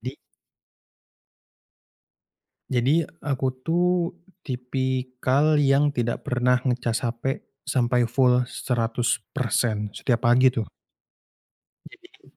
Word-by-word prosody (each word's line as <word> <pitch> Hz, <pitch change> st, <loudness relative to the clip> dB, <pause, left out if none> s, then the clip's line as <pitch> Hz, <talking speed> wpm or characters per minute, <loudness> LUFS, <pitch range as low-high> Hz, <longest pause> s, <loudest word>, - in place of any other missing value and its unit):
Di 130 Hz, +5 st, -6 dB, 2.5 s
Jadi 135 Hz, +6 st, +2 dB, 0.2 s
aku 135 Hz, -2 st, -1 dB, 0.2 s
tuh 175 Hz, +1 st, +1 dB, 0.2 s
tipikal 130 Hz, +2 st, 0 dB
yang 145 Hz, 0 st, +3 dB
tidak 120 Hz, -2 st, -2 dB
pernah 125 Hz, 0 st, +2 dB
ngecas 120 Hz, -1 st, 0 dB
HP 120 Hz, +3 st, -3 dB, 0.2 s
sampai 120 Hz, -1 st, +1 dB
full 125 Hz, +1 st, +3 dB
100% 115 Hz, -3 st, -1 dB
setiap 120 Hz, -1 st, 0 dB
pagi 130 Hz, +2 st, +5 dB
tuh. 115 Hz, -4 st, -3 dB, 1.2 s
Jadi -, -, -20 dB
125 Hz, 85 wpm, -24 LUFS, 120-135 Hz, 2.5 s, pagi